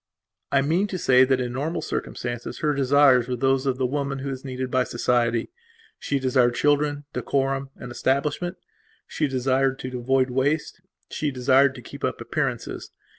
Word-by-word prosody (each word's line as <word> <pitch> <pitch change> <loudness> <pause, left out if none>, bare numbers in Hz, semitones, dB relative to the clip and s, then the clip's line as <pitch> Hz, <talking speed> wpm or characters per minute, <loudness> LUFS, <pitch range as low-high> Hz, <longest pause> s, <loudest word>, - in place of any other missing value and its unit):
I 135 -1 +3
mean 170 +8 +1
to 190 - -4
say 130 -5 +5
that 130 0 +1
in 125 -1 -3
normal 150 +6 -2
circumstances 120 0 -4
her 150 -2 +2
desires 135 -2 +4
were 125 - -1
those 135 +2 +1
of 130 -1 0
the 130 - 0
woman 140 +1 -2
who 135 +1 -4
is 130 -1 -6
needed 130 -1 -4
by 130 0 +3
society. 120 - 0 0.5
She 140 - -1
desired 130 -2 +2
children, 145 +1 +1
decorum, 135 0 -1
an 125 - -9
establishment; 140 +8 -1 0.5
she 155 - -1
desired 135 0 +1
to 125 -1 -5
avoid 130 +1 +1
waste, 145 +7 -1 0.3
she 150 - -1
desired 130 +1 +3
to 125 - -10
keep - - -11
up - - -1
appearances. - - -3
135 Hz, 170 wpm, -24 LUFS, 125-140 Hz, 0.5 s, say